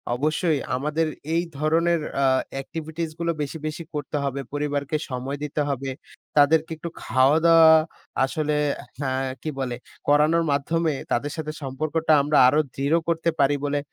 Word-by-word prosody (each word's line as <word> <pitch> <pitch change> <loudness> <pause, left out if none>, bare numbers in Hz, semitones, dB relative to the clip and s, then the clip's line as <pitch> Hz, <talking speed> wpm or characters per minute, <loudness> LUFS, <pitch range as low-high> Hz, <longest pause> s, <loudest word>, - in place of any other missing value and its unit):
অবশ্যই 155 +3 +1 0.2
আমাদের 150 +4 0 0.3
এই 170 +1 +2
ধরনের 165 +3 +2 0.2
আ - - +4 0.3
অ্যাক্টিভিটিসগুলো 160 +3 -4
বেশি, 145 +2 -4
বেশি, 155 +2 -5
করতে 150 0 -3
হবে, 140 0 -2
পরিবারকে 145 0 -1
সময় 130 +2 -4
দিতে 150 +1 -2
হবে, 135 -1 -2 0.5
তাদেরকে 160 +3 +4
একটু 170 +2 -6
খাওয়া-দাওয়া 160 +6 +5 0.5
আসলে 150 +2 -1 0.4
হ্যাঁ, 130 -1 -1
কি 155 - -3
বলে 125 -2 -2 0.3
করানোর 155 +3 +4
মাধ্যমে 160 +3 0 0.2
তাদের 145 +5 0
সাথে 155 -1 -3
সম্পর্কটা 155 +4 -1
আমরা 150 +1 +1
আরও 145 +4 +4 0.2
দৃঢ় 140 +4 +2
করতে 170 0 +1
পারি 140 +1 +4
বলে 145 0 0
150 Hz, 140 wpm, -24 LUFS, 140-160 Hz, 0.5 s, খাওয়া-দাওয়া